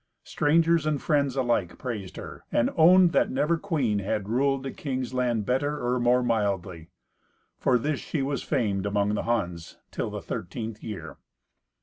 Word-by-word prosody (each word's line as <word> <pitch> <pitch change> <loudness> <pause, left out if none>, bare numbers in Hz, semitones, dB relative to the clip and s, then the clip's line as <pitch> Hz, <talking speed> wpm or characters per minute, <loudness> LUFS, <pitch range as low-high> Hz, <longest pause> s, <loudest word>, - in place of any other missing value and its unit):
Strangers 165 +1 +2
and 150 -2 +1
friends 140 -4 +1
alike 120 -9 0
praised 105 -7 -5
her, - - -9
and 120 - +2
owned 175 +2 +6
that - - +2
never 165 +3 +1
queen 150 - 0
had 100 +1 -2
ruled 135 +3 +1
a 135 - -3
king's 130 -3 -4
land 120 -4 0
better 145 +5 0
or 125 +1 0
more 125 +1 +3
mildly. 100 -7 -1 0.7
For 125 - +3
this 145 +4 -1
she 145 -4 -3
was 140 +1 -2
famed 100 -8 -1
among 100 0 +1
the 105 - 0
Huns 90 -8 -2
till - - -3
the - - -5
thirteenth 110 +4 -5
year. 85 -9 -7
125 Hz, 160 wpm, -26 LUFS, 105-145 Hz, 0.7 s, owned